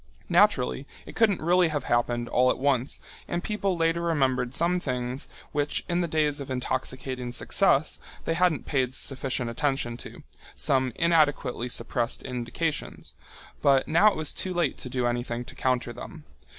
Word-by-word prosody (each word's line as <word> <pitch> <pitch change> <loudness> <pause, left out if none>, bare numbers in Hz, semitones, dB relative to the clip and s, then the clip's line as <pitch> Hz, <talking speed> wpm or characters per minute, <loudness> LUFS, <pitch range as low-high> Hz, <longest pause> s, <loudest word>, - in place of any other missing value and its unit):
Naturally, 65 0 +3 0.2
it - - -11
couldn't 210 -7 +2
really 175 +1 +4
have 150 -2 -2
happened 120 0 0
all 125 +1 +3
at - - +1
once, 135 -1 0 0.3
and 175 0 -2
people 200 -4 -1
later 165 +1 +1
remembered 135 -6 +1
some 175 +2 +3
things 125 -3 -4 0.2
which 145 0 -1
in 175 0 +1
the 170 - 0
days 150 -2 +1
of 140 - -7
intoxicating 130 0 -3
success 120 - +2 0.3
they 165 - +1
hadn't 175 -2 +1
paid 130 -2 0
sufficient 130 -3 0
attention 125 -2 -1
to, - - -11 0.3
some 130 -3 +2
inadequately 145 -7 +2
suppressed 115 0 -2
indications, 130 +5 -4 0.5
but 135 -2 +4
now 170 +7 +5
it 210 - +4
was 155 -2 -1
too 185 -1 -3
late 170 -5 +1
to 125 - -7
do 125 0 -1
anything 120 0 -2
to - - -9
counter 125 -2 -1
them. - - -9
135 Hz, 160 wpm, -27 LUFS, 125-165 Hz, 0.5 s, now